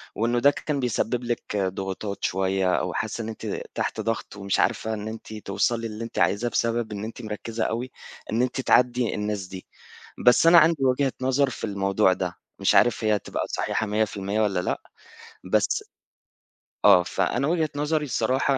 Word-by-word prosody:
وإنه 120 +2 +1
ده 140 +4 +6
كان 145 -1 -3
بيسبب 125 0 -1
لِك 120 -3 -3
ضغوطات 95 +1 -3
شوية 95 0 +1
أو 90 - -1
حاسّة 110 +2 -3
إن 110 - -5
أنتِ 110 - -5
تحت - - -2
ضغط 115 -2 -3
ومش 100 -1 -1
عارفة 110 0 +1
إن 105 0 -5
أنتِ 110 0 -8
توصلي 115 +3 -1
للي 110 +1 -6
أنتِ 115 - -5
عايزاه، 100 +7 +2
بسبب 115 -1 0
إن 100 0 -5
أنتِ 115 +2 -7
مركّزة 110 +1 -4
أوي، 120 +3 -2 0.4
إن 115 +3 +1
أنتِ 130 +1 0
تعدّي 125 -2 +3
الناس 105 -2 -2
دي. 95 -1 -9 0.6
بس 125 +6 +6
أنا 170 +1 +8
عندي 155 -4 +3
وجهة 130 +1 +2
نظر 130 +1 +2
في - - -8
الموضوع 100 -2 +2
ده، 90 -2 -3 0.2
مش - - +3
عارف 120 -1 +4
هي 105 -1 +2
تبقى - - -4
صحيحة 110 - -1
100% 105 0 -1
والَّا 100 -4 +1
لأ، - - -2 0.6
بس - - +1 1.0
آه 90 - +8
فأنا 125 +9 0
وجهة 160 -2 +1
نظري 150 +1 0
الصراحة، 130 +2 +1
110 Hz, 170 wpm, -25 LUFS, 100-125 Hz, 1.0 s, أنا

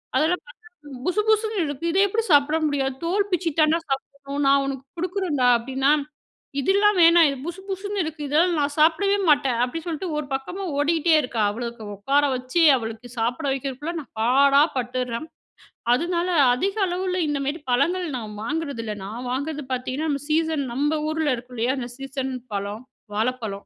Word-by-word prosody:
அதெல்லாம் 330 +4 +1
பார்த்தா, 465 -3 -17 0.4
"புசு 365 +4 +2
புசுன்னு 435 -3 +2
இருக்கு. 285 +3 -5
இத 365 - -1
எப்படி 445 +3 -1
சாப்பிட 290 +2 +4
முடியாது". 270 -2 -1
"தோல் 395 +4 0
பிச்சு 360 -1 +1
தான்டா 310 +2 +4
சாப்பிடணும். 275 +1 -3
நான் 275 0 +5
உனக்கு 270 -1 -5
குடுக்குறேன்டா." 345 -7 0
அப்படின்னா, 265 +4 0 0.7
"இதெல்லாம் 400 +6 +3
வேணாம். 335 -1 +7
இது 275 - -4
புசு 350 +2 -6
புசுன்னு 400 +1 -2
இருக்கு. 315 -1 -6
இதெல்லாம் 330 +4 +2
நான் 290 0 -1
சாப்பிடவே 335 +6 +4
மாட்டேன்". 275 -5 +3
அப்படி 290 +7 -5
சொல்லிட்டு 340 +2 -3
ஒரு 300 - -4
பக்கமா 310 +9 -4
ஓடிட்டே 325 +3 +2
இருக்கா. 245 -4 -3
அவ்வளவுக்கு 235 +1 -6
உட்கார 275 +9 +2
வச்சு, 255 +7 0
அவளுக்கு 225 +1 -7
சாப்பிட 245 +7 -1
வைக்கிறதுக்குள்ள 275 +5 -4
நான் 280 - -17
பாடா 275 +4 +5
பட்டுர்றேன். 250 +2 -3 0.7
அதனால 345 +5 -1 0.2
அதிக 385 +11 -1
அளவில 365 +1 -2
இந்தமாரி 290 +1 -2
பழங்கள் 340 +9 +1
நான் 215 -3 -7
வாங்குறதில்ல. 275 -6 -3
நான் 235 +5 -6
வாங்குறது 285 +2 -3
பார்த்தீங்கன்னா, 260 +5 -2
நம்ம 280 -1 -3
சீசன் 315 -2 +1
நம்ப 290 +4 +1 0.2
ஊர்ல 315 -3 0
இருக்கும் 245 +1 -11
இல்லையா? 240 +4 +1
அந்த 240 -1 -5
சீசன் 270 -1 -4 0.2
பழம் 205 +3 -4 0.3
வாழப்பழம், 220 -2 -2
285 Hz, 155 wpm, -23 LUFS, 255-335 Hz, 0.7 s, வேணாம்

